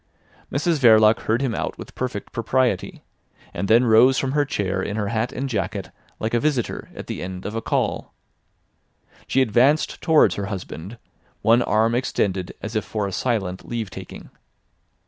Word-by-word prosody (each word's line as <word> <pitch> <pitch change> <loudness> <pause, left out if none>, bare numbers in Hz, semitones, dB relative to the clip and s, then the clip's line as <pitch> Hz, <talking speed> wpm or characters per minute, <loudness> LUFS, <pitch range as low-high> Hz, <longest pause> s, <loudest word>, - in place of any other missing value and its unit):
Mrs 150 +3 +1
Verloc 110 -3 +6
heard 115 +5 +1
him 125 -4 0
out - - -3
with - - -10
perfect 125 -5 -4
propriety, 120 -4 -1 0.5
and 100 - -3
then 115 +4 +5
rose 120 +4 +6
from 135 - 0
her 145 +1 +2
chair 95 -9 -2
in 100 - -3
her 105 -2 -1
hat 115 +2 -1
and 135 +2 -3
jacket 100 -4 -3 0.3
like 110 +1 -2
a 120 - +3
visitor 135 -4 -1
at - - -7
the - - -5
end 90 0 -6
of 105 - -4
a 115 - -2
call. - - -1 1.2
She 135 - +3
advanced 130 +7 +2
towards 160 -2 +4
her 100 -1 -4
husband, 95 +1 -7 0.5
one 115 +2 +5
arm 110 0 +2
extended 100 -7 -1
as 110 +2 -5
if 110 - +1
for 105 -2 -3
a 100 - -3
silent 95 -5 -2
leave 115 -5 -3
taking. - - -10
115 Hz, 170 wpm, -23 LUFS, 100-130 Hz, 1.2 s, Verloc